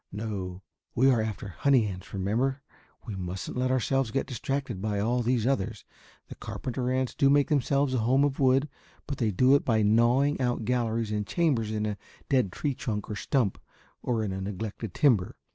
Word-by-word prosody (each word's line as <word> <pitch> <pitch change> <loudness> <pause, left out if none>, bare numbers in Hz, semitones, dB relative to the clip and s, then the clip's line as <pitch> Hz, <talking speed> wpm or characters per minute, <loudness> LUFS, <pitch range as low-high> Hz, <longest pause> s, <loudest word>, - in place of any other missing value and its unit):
"No, 100 -3 -5 0.3
we 135 +3 +5
are 120 -3 +2
after 110 -2 -4
honey 125 - +3
ants, 95 -3 -7
remember. 120 +8 -1 0.4
We 110 - -5
mustn't 90 0 -5
let 130 0 0
ourselves 130 0 +1
get 135 +5 -1
distracted 130 -4 -3
by 105 -1 -1
all 120 +4 +1
these 120 -1 +1
others. 125 -7 -1 0.4
The - - -8
carpenter 125 0 -4
ants 130 -1 0
do 140 - +3
make 145 0 +4
themselves 140 -1 +1
a 125 - +1
home 130 +5 +3
of 145 -1 0
wood, 135 +1 +3 0.4
but 140 - -5
they 115 - +2
do 125 +7 +4
it 140 - +4
by 110 -3 +2
gnawing 120 +7 +3
out 120 -3 0
galleries 115 -2 0
and 105 -1 -2
chambers 140 -11 +1
in 110 -1 -1
a 105 -1 -2 0.3
dead 130 -9 +2
tree 145 - -2
trunk 110 -6 -4
or - - -3
stump 105 0 0 0.4
or 115 -3 -1
in 100 - -2
a 95 0 -4
neglected 105 +1 -5
timber. 115 -11 +3
120 Hz, 190 wpm, -28 LUFS, 105-135 Hz, 0.4 s, we